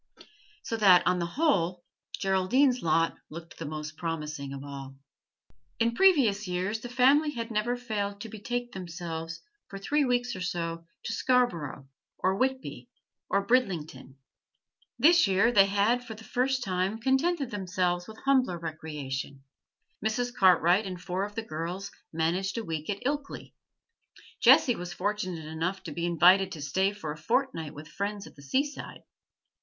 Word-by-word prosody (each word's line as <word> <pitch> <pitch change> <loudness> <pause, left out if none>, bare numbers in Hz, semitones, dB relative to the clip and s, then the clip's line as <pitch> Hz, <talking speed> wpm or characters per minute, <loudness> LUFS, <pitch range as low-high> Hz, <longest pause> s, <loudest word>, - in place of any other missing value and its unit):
So 225 - -3
that, 190 -5 +6
on 180 +1 +2
the 170 - -1
whole, 180 - +1 0.3
Geraldine's 235 +7 +2
lot 165 0 +2
looked 165 +2 -10
the - - -5
most 155 +1 -6
promising 155 -4 -4
of 140 0 -7
all. 135 -1 -8 0.8
In 230 0 +1
previous 235 - +4
years; 185 +4 -1
the 245 - -8
family 270 +5 +4
had 230 0 -4
never 225 +3 0
failed 205 -4 -3
to 225 - -6
betake 240 +3 -4
themselves 170 -2 -6 0.2
for 195 - -8
three 290 +10 +1
weeks 245 -2 0
or 185 - -6
so 170 -2 -3 0.2
to 225 - -3
Scarborough, 175 - 0 0.3
or 190 +1 +1
Whitby, 260 +4 -2 0.4
or 200 - +1
Bridlington; 160 - -1 0.8
this 335 -4 +6
year 195 +5 +3
they 195 -4 +6
had 205 +5 +2
for 225 -3 -8
the 220 - -13
first 255 +2 0
time 185 +1 -1
contented 265 +3 +1
themselves 180 -3 -1
with 220 - -11
humbler 260 -9 +3
recreation; 150 -4 -6 0.6
Mrs. 240 +3 -1
Cartwright 185 -1 +4
and 185 -1 -6
four 185 +2 -2
of 205 0 -10
the 225 - -3
girls 180 +1 -5 0.2
managed 175 +6 -1
a 230 - -3
week 160 -3 -4
at 200 -1 -3
Ilkley, 285 +1 -3 0.9
Jessie 245 - +6
was 175 0 -6
fortunate 185 -4 -3
enough 165 +5 -3
to 165 - -6
be 170 +3 -2
invited 185 +3 +5
to 155 - -8
stay 190 +6 +1
for 205 -7 -6
a 150 - -7
fortnight 165 - -1
with 150 +1 -9
friends 200 +5 -4
at - - -14
the 140 - -14
seaside. 275 - -3
195 Hz, 155 wpm, -28 LUFS, 165-235 Hz, 0.9 s, that